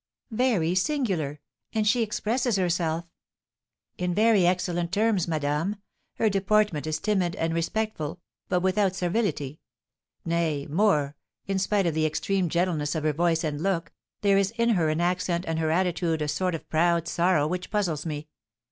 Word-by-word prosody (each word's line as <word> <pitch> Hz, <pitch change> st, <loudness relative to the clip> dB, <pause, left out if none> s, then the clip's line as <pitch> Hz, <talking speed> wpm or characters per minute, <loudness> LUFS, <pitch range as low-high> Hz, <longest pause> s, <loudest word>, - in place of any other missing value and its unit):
"Very 215 Hz, -8 st, +1 dB
singular! 185 Hz, -, -1 dB, 0.3 s
And 215 Hz, -2 st, +1 dB
she 240 Hz, +3 st, +3 dB
expresses 230 Hz, +2 st, 0 dB
herself 170 Hz, -3 st, 0 dB, 0.5 s
" -, -, -58 dB
"In 180 Hz, -1 st, -1 dB
very 210 Hz, -4 st, +4 dB
excellent 175 Hz, -1 st, 0 dB
terms, 205 Hz, -3 st, +2 dB
madame; 155 Hz, +4 st, -1 dB, 0.4 s
her 225 Hz, -, +2 dB
deportment 200 Hz, -5 st, +1 dB
is 155 Hz, 0 st, -1 dB
timid 190 Hz, -3 st, 0 dB
and 165 Hz, -4 st, -1 dB
respectful, 170 Hz, -2 st, -2 dB, 0.3 s
but 180 Hz, -, +2 dB
without 190 Hz, 0 st, +1 dB
servility; 175 Hz, -, -1 dB, 0.7 s
nay, 165 Hz, -4 st, 0 dB
more, 150 Hz, -4 st, +1 dB, 0.3 s
in 195 Hz, -1 st, -1 dB
spite 195 Hz, 0 st, +1 dB
of 170 Hz, -, +1 dB
the 155 Hz, 0 st, +2 dB
extreme 185 Hz, +3 st, -1 dB
gentleness 165 Hz, -4 st, 0 dB
of 155 Hz, -, -2 dB
her 155 Hz, -1 st, +1 dB
voice 165 Hz, +1 st, +1 dB
and 150 Hz, -2 st, -2 dB
look, 180 Hz, -2 st, -1 dB, 0.3 s
there 200 Hz, -1 st, +4 dB
is 195 Hz, -1 st, +2 dB
in 235 Hz, 0 st, +2 dB
her 175 Hz, -8 st, +2 dB
accent 175 Hz, 0 st, 0 dB
and 165 Hz, 0 st, -1 dB
her 160 Hz, -1 st, 0 dB
attitude 170 Hz, -2 st, 0 dB
a -, -, -2 dB
sort 180 Hz, +4 st, 0 dB
of 160 Hz, -, -8 dB
proud 170 Hz, +1 st, +2 dB
sorrow 170 Hz, -4 st, +2 dB
which 180 Hz, +3 st, -3 dB
puzzles 180 Hz, -8 st, -1 dB
me. 150 Hz, -2 st, -5 dB
175 Hz, 160 wpm, -26 LUFS, 160-200 Hz, 0.7 s, very